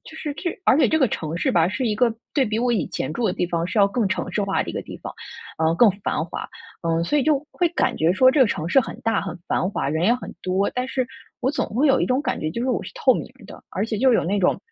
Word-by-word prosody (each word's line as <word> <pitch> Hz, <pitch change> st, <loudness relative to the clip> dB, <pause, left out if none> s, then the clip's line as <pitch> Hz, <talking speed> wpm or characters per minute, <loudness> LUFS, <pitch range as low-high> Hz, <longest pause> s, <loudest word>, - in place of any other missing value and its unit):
就 315 Hz, -, -12 dB
是 300 Hz, -2 st, -4 dB
这 345 Hz, -, -3 dB
而 270 Hz, -, +5 dB
且 -, -, +5 dB
这 315 Hz, -, +2 dB
个 265 Hz, -, +4 dB
城 160 Hz, -4 st, -4 dB
市 -, -, +1 dB
吧， 170 Hz, -1 st, +4 dB
是 250 Hz, +6 st, -2 dB
一 215 Hz, -, +1 dB
个 235 Hz, +1 st, +2 dB, 0.2 s
对 275 Hz, -3 st, +3 dB
比 215 Hz, -1 st, -1 dB
我 245 Hz, +1 st, +1 dB
以 225 Hz, -, 0 dB
前 130 Hz, -, -3 dB
住 235 Hz, +4 st, -1 dB
的 185 Hz, -, +1 dB
地 175 Hz, -, -1 dB
方 170 Hz, 0 st, -1 dB
是 185 Hz, +4 st, -2 dB
要 200 Hz, -, +6 dB
更 215 Hz, 0 st, 0 dB
城 190 Hz, -, -2 dB
市 210 Hz, -, 0 dB
化 195 Hz, -1 st, 0 dB
的 -, -, -10 dB
一 -, -, -3 dB
个 -, -, -3 dB
地 -, -, -9 dB
方， -, -, -7 dB, 0.5 s
呃， 160 Hz, +1 st, +2 dB
更 235 Hz, -4 st, +6 dB
繁 -, -, -1 dB
华。 170 Hz, -, -6 dB, 0.4 s
嗯， 165 Hz, 0 st, +1 dB
所 295 Hz, +12 st, +1 dB
以 -, -, +2 dB
就 290 Hz, 0 st, +3 dB
会 350 Hz, -, +1 dB
感 260 Hz, -8 st, 0 dB
觉 160 Hz, +2 st, +2 dB
说 255 Hz, +6 st, +5 dB
这 295 Hz, -, 0 dB
个 260 Hz, -, +7 dB
城 160 Hz, -6 st, -2 dB
市 270 Hz, +9 st, +5 dB
很 225 Hz, -, -6 dB
大、 225 Hz, -2 st, +1 dB
很 185 Hz, -2 st, -6 dB
繁 185 Hz, -, 0 dB
华、 140 Hz, -, -2 dB
人 160 Hz, +3 st, 0 dB
也 230 Hz, +5 st, +4 dB
很 250 Hz, -, -7 dB
多， 185 Hz, +2 st, 0 dB
但 250 Hz, 0 st, -1 dB
是 255 Hz, -2 st, -1 dB, 0.3 s
我 260 Hz, -, +1 dB
总 295 Hz, -, -1 dB
会 260 Hz, +8 st, +1 dB
有 270 Hz, -2 st, +4 dB
一 -, -, +1 dB
种 255 Hz, +2 st, +1 dB
感 -, -, -2 dB
觉， 155 Hz, -, -2 dB
就 235 Hz, +9 st, -3 dB
是 260 Hz, -, -1 dB
我 -, -, -1 dB
是 -, -, -8 dB
透 480 Hz, -, +4 dB
明 -, -, -3 dB, 0.2 s
的。 -, -, -12 dB
而 195 Hz, -, -1 dB
且 225 Hz, -, -2 dB
就 260 Hz, +1 st, +4 dB
有 -, -, +2 dB
那 200 Hz, +4 st, 0 dB
种， 180 Hz, -, +2 dB
220 Hz, 330 characters per minute, -23 LUFS, 180-260 Hz, 0.5 s, 个